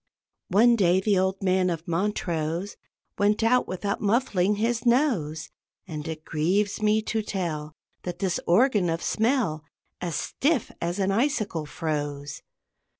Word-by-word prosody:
One 230 Hz, +5 st, +5 dB
day 185 Hz, -4 st, +3 dB
the 195 Hz, -1 st, +2 dB
old 190 Hz, +1 st, -1 dB
man 185 Hz, -1 st, +2 dB
of 165 Hz, -1 st, -4 dB
Montrose 170 Hz, -1 st, -2 dB, 0.4 s
Went 210 Hz, +2 st, +2 dB
out 250 Hz, +2 st, +3 dB
without 200 Hz, +2 st, -3 dB
muffling 210 Hz, -3 st, +2 dB
his 230 Hz, +2 st, 0 dB
nose; 235 Hz, -, +1 dB, 0.4 s
And 155 Hz, -2 st, -6 dB
it 155 Hz, -1 st, -6 dB
grieves 190 Hz, +8 st, 0 dB
me 215 Hz, 0 st, +2 dB
to 220 Hz, 0 st, -1 dB
tell 165 Hz, -7 st, -4 dB, 0.3 s
That 175 Hz, -1 st, -5 dB
this 180 Hz, -2 st, -1 dB
organ 205 Hz, -1 st, +4 dB
of 165 Hz, +1 st, -2 dB
smell 220 Hz, -, 0 dB, 0.4 s
As 170 Hz, -3 st, -2 dB
stiff 280 Hz, -, 0 dB
as 170 Hz, +2 st, -2 dB
an 195 Hz, -1 st, +1 dB
icicle 210 Hz, -, 0 dB
froze. 145 Hz, -2 st, -4 dB
190 Hz, 140 wpm, -26 LUFS, 165-215 Hz, 0.4 s, One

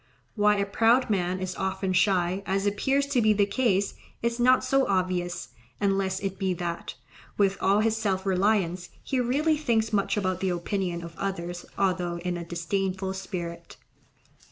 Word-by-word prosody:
Why 210 Hz, -1 st, +3 dB
a 200 Hz, -, +1 dB
proud 225 Hz, +4 st, +3 dB
man 185 Hz, -2 st, 0 dB
is 185 Hz, 0 st, -4 dB
often 190 Hz, 0 st, -2 dB
shy, 185 Hz, 0 st, +2 dB
as 195 Hz, +1 st, 0 dB
appears 265 Hz, +8 st, +1 dB
to 280 Hz, -3 st, +1 dB
be 215 Hz, -1 st, +4 dB
the 205 Hz, -1 st, +3 dB
case, 200 Hz, -2 st, +1 dB, 0.3 s
is 235 Hz, +1 st, 0 dB
not 255 Hz, +2 st, +5 dB
so 270 Hz, +1 st, +2 dB
obvious, 180 Hz, -2 st, -1 dB, 0.3 s
unless 195 Hz, -1 st, +1 dB
it 195 Hz, -1 st, -4 dB
be 190 Hz, -2 st, 0 dB
that, 170 Hz, 0 st, -4 dB, 0.4 s
with 195 Hz, -1 st, +3 dB
all 200 Hz, +2 st, +3 dB
his 225 Hz, 0 st, +1 dB
self 195 Hz, -3 st, -1 dB
reliance, 190 Hz, -2 st, +1 dB
he 265 Hz, -, -1 dB
really 290 Hz, +6 st, +2 dB
thinks 225 Hz, -6 st, 0 dB
much 200 Hz, 0 st, +1 dB
about 185 Hz, -3 st, 0 dB
the 190 Hz, -, 0 dB
opinion 175 Hz, 0 st, -2 dB
of 170 Hz, 0 st, -8 dB
others 175 Hz, -3 st, -4 dB
although 180 Hz, -3 st, 0 dB
in 175 Hz, +1 st, -3 dB
a 175 Hz, -, -4 dB
disdainful 190 Hz, +3 st, -2 dB
spirit. 180 Hz, -3 st, -6 dB
195 Hz, 165 wpm, -27 LUFS, 180-215 Hz, 0.4 s, not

